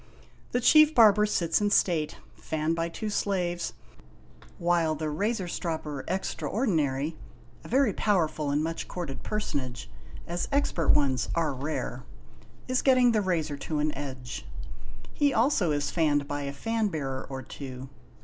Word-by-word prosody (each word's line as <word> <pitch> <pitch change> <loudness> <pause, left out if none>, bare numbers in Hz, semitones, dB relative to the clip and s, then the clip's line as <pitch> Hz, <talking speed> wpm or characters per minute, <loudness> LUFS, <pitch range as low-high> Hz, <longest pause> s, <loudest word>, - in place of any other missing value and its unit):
The 245 - +1
Chief 305 +4 +6
Barber 210 -2 +6
sits 170 -3 +1
in 205 - +2
state, 165 -6 +2 0.2
fanned 160 +1 -2
by 165 0 -1
two 210 +5 -4
slaves, 180 -4 -1 0.8
while 170 -2 +2
the 155 0 -3
Razor 200 +4 -1
Stropper 160 -5 -4
Extraordinary 160 - -1 0.5
(a - - -10
very 260 -3 +3
powerful 160 -7 +1
and 145 +2 +1
much 165 +1 -3
courted 145 -8 -5
personage, 135 - -4 0.3
as 175 +1 -3
expert 275 - +1
ones 135 -4 +3
are 160 -4 +1
rare) 140 +4 -4 0.6
is 255 0 +1
getting 255 -2 +5
the 215 -2 +2
razor 160 -6 -1
to 155 +2 -3
an 150 0 0
edge. 130 -3 -6 0.7
He 290 -2 +2
also 225 - +3
is 145 -1 0
fanned 145 -4 +1
by 145 0 -3
a 140 - -3
fan 225 +10 -1
bearer 135 -7 -4
or 135 -1 -5
two. 130 0 -8
165 Hz, 145 wpm, -28 LUFS, 145-210 Hz, 0.8 s, Chief